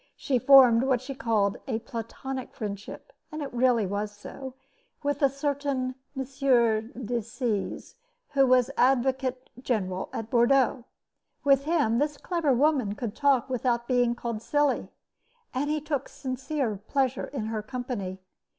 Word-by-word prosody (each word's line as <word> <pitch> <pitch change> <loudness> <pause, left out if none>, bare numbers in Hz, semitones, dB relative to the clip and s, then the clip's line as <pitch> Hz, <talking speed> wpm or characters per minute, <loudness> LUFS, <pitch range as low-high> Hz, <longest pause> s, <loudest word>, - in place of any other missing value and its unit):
She 260 -3 0
formed 250 -3 +7
what 260 -1 +2
she 265 +3 -6
called 215 -6 +1
a 235 -4 0
platonic 235 +3 -6
friendship 210 - -7 0.2
and 305 -1 -4
it 275 - -7
was 240 - -4
really 215 -5 +2
so 250 +6 -9 0.5
with 285 0 -1
a 275 - +5
certain 275 -2 -2 0.2
M. 265 - 0
de 240 -3 +1
Seze, 220 -2 -3 0.4
who 275 -1 +3
was 255 0 +4
advocate 260 0 +1
general 190 -8 -2
at 225 0 -5
Bordeaux. 245 0 +3 0.6
With 275 -1 +4
him 290 -8 +2
this 295 0 0
clever 335 -4 0
woman 260 -5 +2
could 225 -2 -5
talk 275 -4 +3
without 245 -2 -1
being 245 -2 +2
called 235 -2 -4
silly, 290 +2 +1 0.6
and 280 +3 -1
he 305 0 +1
took 295 -2 -3
sincere 260 -3 -3
pleasure 270 -2 0
in 260 -6 -4
her 220 -1 -2
company. 215 -5 -5
255 Hz, 140 wpm, -27 LUFS, 230-275 Hz, 0.6 s, formed